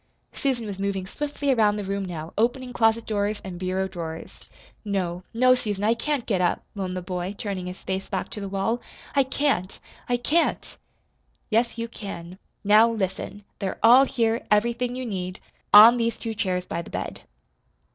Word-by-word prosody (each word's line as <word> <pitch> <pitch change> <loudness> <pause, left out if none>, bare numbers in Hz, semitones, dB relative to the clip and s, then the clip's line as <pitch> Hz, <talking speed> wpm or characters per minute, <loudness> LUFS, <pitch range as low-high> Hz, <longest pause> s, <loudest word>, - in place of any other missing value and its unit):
Susan 255 -5 -1
was 200 -2 -6
moving 195 -1 -2
swiftly 285 +5 -2
around 215 -4 +3
the 210 - -3
room 200 0 -2
now, 165 -3 -6
opening 245 +3 0
closet 225 -1 +2
doors 205 0 -1
and 180 -2 -7
bureau 185 +1 -1
drawers. 165 -3 -7 0.4
"No, 185 -4 -2
no, 255 +2 +5
Susan, 205 -5 -2
I 220 +2 +4
can't 270 +2 -2
get 195 -5 0
up," 175 - +1
moaned 185 -3 -3
the 180 - -4
boy 180 +2 -4
turning 195 -5 -4
his 180 +1 -6
face 190 0 -3
back 190 -3 -3
to 210 - -6
the 200 - -4
wall. 200 +5 -1 0.3
"I 280 - +6
can't 265 -8 0 0.3
I 245 - +2
can't!" 305 +8 0 0.8
"Yes, 235 +2 +2
you 230 0 -3
can. 185 -5 -8 0.2
Now, 215 +3 +6
listen. 205 -1 -3 0.2
They're 190 -1 -3
all 245 +4 +8
here, 230 -4 0
everything 235 +3 +1
you 255 0 -4
need, 185 -4 -4 0.3
on 220 +4 +10
these 230 -1 0
two 225 -1 -4
chairs 185 -4 -1
by 170 - -3
the - - -11
bed." - - -5
210 Hz, 175 wpm, -25 LUFS, 190-235 Hz, 0.8 s, on